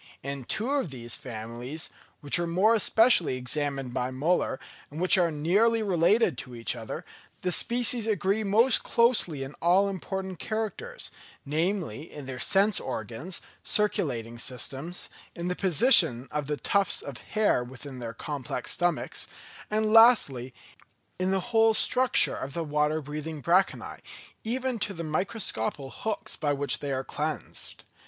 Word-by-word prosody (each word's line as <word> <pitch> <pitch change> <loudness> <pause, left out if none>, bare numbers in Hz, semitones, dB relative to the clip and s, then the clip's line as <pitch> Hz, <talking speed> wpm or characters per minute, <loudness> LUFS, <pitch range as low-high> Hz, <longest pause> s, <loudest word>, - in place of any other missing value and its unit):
In 140 -1 -5
two 230 - -1
of 280 - 0
these 120 -3 -6
families, 120 +3 -6 0.3
which 145 +4 +3
were 170 - -1
more 190 +7 +3
especially 220 - +4
examined 135 0 -2
by 125 0 -1
Müller, 140 +2 0 0.3
and 150 - -8
which 185 +2 +6
are 175 -3 +3
nearly 200 +10 +2
related 185 - +2
to 125 -2 -8
each 115 -3 -1
other, - - -7 0.4
the 180 - 0
species 235 +2 +4
agree 205 0 0
most 225 +5 +4
closely 230 - +2
in 135 +2 -8
all 185 +4 +4
important 190 -1 -5
characters: 225 - -4 0.3
namely 160 - -2
in 145 -2 -9
their 130 -1 -7
sense 200 +1 +3
organs, 125 - -5 0.2
circulating 125 - -1
systems, 135 +8 -3 0.3
in 170 +1 -4
the 180 - -1
position 175 - +4
of 150 -2 -3
the 150 0 -2
tufts 200 +3 +1
of 135 -4 -8
hair 215 - 0
within 130 +1 -9
their 115 -1 -6
complex 135 -2 -5
stomachs, 175 0 -1 0.4
and 215 0 0
lastly 215 - +5 0.7
in 185 +1 0
the 190 +3 -2
whole 225 0 +5
structure 255 +2 +3
of 135 +1 -6
the 170 - -2
water 150 0 0
breathing 150 +2 -6
branchiæ, 180 +6 0 0.4
even 250 +1 -2
to 205 -1 -3
the 165 - -5
microscopical 155 - -2
hooks 215 -1 -4
by 150 -2 -1
which 140 -2 +1
they 145 - -4
are 130 0 -2
cleansed. - - -5
170 Hz, 145 wpm, -27 LUFS, 135-210 Hz, 0.7 s, which